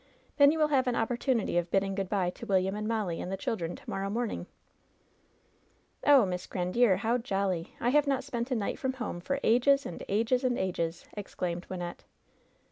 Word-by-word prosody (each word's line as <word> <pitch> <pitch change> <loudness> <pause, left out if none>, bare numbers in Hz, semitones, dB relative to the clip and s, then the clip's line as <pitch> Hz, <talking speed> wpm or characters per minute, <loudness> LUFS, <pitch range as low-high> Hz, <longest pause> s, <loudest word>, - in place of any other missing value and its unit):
Then 285 0 +7
you 320 - -1
will 305 -1 +3
have 265 -3 +2
an 245 - +1
opportunity 235 -4 +1
of 175 0 -4
bid 195 - +3
ding 195 0 -2
good 195 -1 -3
by 185 -4 +1
to - - -10
William 190 -1 +2
and 210 0 -3
Molly 210 -7 -1
and 180 - -5
the 195 - -2
children 175 -4 -3
to - - -16
morrow 195 0 -2
morning." 230 +2 -2 1.6
"Oh, 280 -6 +7
Miss 180 -1 -4
Grandiere, 185 +3 +2
how 230 +5 +1
jolly! 195 -7 -2
I 240 - +1
have 295 +2 +3
not 270 -2 +1
spent 245 -2 -3
a 255 - 0
night 210 -4 -2
from 260 0 -1
home 245 -8 -4
for 275 +10 -2
ages 275 +5 +4
and 175 - -6
ages 230 +5 +1
and 250 -1 +1
ages 170 -3 -2
!" - - -29
exclaimed 180 -3 -4
Wymxette. 175 -2 -6
210 Hz, 205 wpm, -30 LUFS, 185-250 Hz, 1.6 s, Then